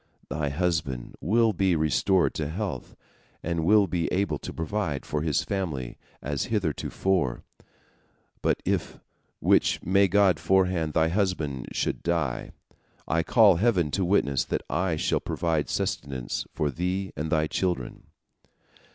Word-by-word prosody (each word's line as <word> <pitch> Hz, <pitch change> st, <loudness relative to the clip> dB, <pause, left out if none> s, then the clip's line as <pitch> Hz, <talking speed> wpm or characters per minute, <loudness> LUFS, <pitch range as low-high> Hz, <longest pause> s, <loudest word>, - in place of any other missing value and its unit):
Thy 75 Hz, -2 st, -1 dB
husband 70 Hz, -5 st, -2 dB
will 110 Hz, +5 st, +3 dB
be 95 Hz, -1 st, +2 dB
restored 85 Hz, +4 st, +2 dB
to 75 Hz, -2 st, -3 dB
health, 90 Hz, -, -5 dB, 0.5 s
and 85 Hz, -1 st, -1 dB
will 105 Hz, +4 st, +5 dB
be 90 Hz, -3 st, -1 dB
able 90 Hz, -6 st, 0 dB
to -, -, -7 dB
provide 80 Hz, -4 st, -3 dB
for 75 Hz, -, -2 dB
his 75 Hz, -4 st, +1 dB
family 80 Hz, -11 st, -3 dB, 0.2 s
as 70 Hz, 0 st, -2 dB
heretofore. 95 Hz, -, -1 dB, 1.0 s
But -, -, 0 dB
if—which -, -, -1 dB
may 100 Hz, +3 st, +4 dB
God 95 Hz, -3 st, +3 dB
forefend—thy 85 Hz, -4 st, +2 dB
husband 85 Hz, -, -1 dB
should -, -, -1 dB
die, 80 Hz, -7 st, -1 dB, 0.6 s
I 80 Hz, -, +2 dB
call 105 Hz, -1 st, +5 dB
Heaven 90 Hz, -7 st, +2 dB
to 95 Hz, -, 0 dB
witness 70 Hz, -9 st, +2 dB
that -, -, -2 dB
I 85 Hz, +4 st, 0 dB
shall 75 Hz, -, 0 dB
provide 80 Hz, -3 st, -1 dB
sustenance 65 Hz, -4 st, -3 dB
for 75 Hz, -2 st, -1 dB
thee 90 Hz, +4 st, -2 dB
and 75 Hz, +1 st, -4 dB
thy 80 Hz, -2 st, +2 dB
children." 85 Hz, -5 st, -3 dB
85 Hz, 130 wpm, -26 LUFS, 75-95 Hz, 1.0 s, will